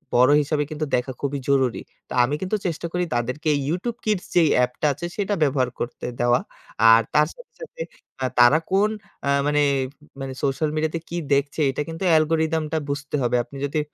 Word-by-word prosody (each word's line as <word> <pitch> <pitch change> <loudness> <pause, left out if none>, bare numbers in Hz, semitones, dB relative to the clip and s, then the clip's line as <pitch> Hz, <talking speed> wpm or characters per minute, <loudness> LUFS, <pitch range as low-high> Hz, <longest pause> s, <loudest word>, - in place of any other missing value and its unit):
বড় 125 +3 +6
হিসাবে 150 0 0
কিন্তু 155 0 -2
দেখা 125 +2 -1
খুবই 140 0 -2
জরুরি। 130 -3 +2 0.3
তো - - -6
আমি 140 +4 0
কিন্তু 190 +3 -1
চেষ্টা 170 0 -2
করি 180 0 0
তাদেরকে 125 +6 -1 0.2
YouTube 220 +8 -2
Kids 205 -3 0
যেই 165 -4 +5
অ্যাপটা 125 +4 +1
আছে 150 +6 -6
সেটা 205 0 0
ব্যবহার 130 -3 +1
করতে 120 - -5
দেওয়া। 120 0 +3 0.5
আর 115 +1 +7
তার 150 0 +4
সাথে, 485 - -15
সাথে - - -9 0.6
তারা 120 +6 +7
কোন 200 +2 +3 0.3
অ্যাঁ 140 0 +2
মানে 150 0 +2 0.6
মানে 135 -1 -4
সোশ্যাল 140 +3 0
মিডিয়াতে 160 +1 -1
কি 175 - -4 0.2
দেখছে 140 +2 0
এটা 135 - -3
কিন্তু 165 +4 -6
অ্যালগরিদমটা 160 0 +2
বুঝতে 140 +1 -3
হবে। 120 0 +1
আপনি 140 +2 -12
যদি 145 +2 -1
150 Hz, 175 wpm, -23 LUFS, 135-165 Hz, 0.6 s, আর